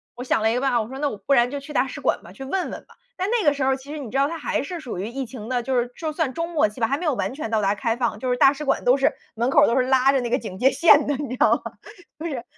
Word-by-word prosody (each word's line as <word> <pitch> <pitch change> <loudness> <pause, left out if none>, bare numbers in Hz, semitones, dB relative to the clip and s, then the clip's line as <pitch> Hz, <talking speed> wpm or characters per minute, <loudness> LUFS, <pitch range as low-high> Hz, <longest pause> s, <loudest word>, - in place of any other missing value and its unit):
我 245 - -6
想 250 - +1
了 220 - +3
一 - - 0
个 250 - -1
办 270 - +1
法， 240 -2 +2
我 215 - -5
说： 265 - -8
“那 290 -1 0
我 210 - -7
不 200 +8 0
然 240 -2 +4
就 285 - -3
去 300 +2 -10
大 265 0 +2
使 - - -7
馆 - - 0
吧， - - -13
去 270 - -10
问 365 +6 -2
问 - - -8
吧。” - - -20 0.2
但 375 +3 -1
那 465 -6 +1
个 290 - +6
时 280 -2 -3
候 265 0 +2
其 270 +2 -11
实 305 - -5
你 255 -6 -7
知 270 - -2
道 275 - +3
它 330 +2 -5
还 - - -1
是 345 +3 -6
属 250 - -6
于 200 - -3
疫 265 +3 -4
情 225 -2 -9
的， 250 -1 0
就 265 +1 -1
是 240 +1 -3
就 315 -2 -4
算 305 -4 -1
中 335 +3 -3
末 300 -10 +2
期 210 - -13
吧， 225 - +3
还 275 - 0
没 350 - -5
有 300 - +2
完 200 -1 -2
全 270 -5 -5
到 220 - +2
达 200 0 +1
开 225 +2 -1
放。 235 -4 -1
就 255 +2 -3
是 245 - +1
大 275 +2 +6
使 300 +1 -7
馆 - - 0
都 250 +2 +5
是， 275 0 +3 0.2
门 235 +3 0
口 - - +6
都 235 - +1
是 260 - +3
拉 265 0 +4
着 270 -2 +1
那 240 - -3
个 250 - +2
警 190 -6 -8
戒 265 +5 +4
线 300 -4 +5
的 290 - +1
你 280 -2 -5
知 255 - -5
道 - - +4
吗。 - - -6 0.5
就 320 - -6
是 260 -7 -4
265 Hz, 395 characters per minute, -23 LUFS, 240-290 Hz, 0.5 s, 个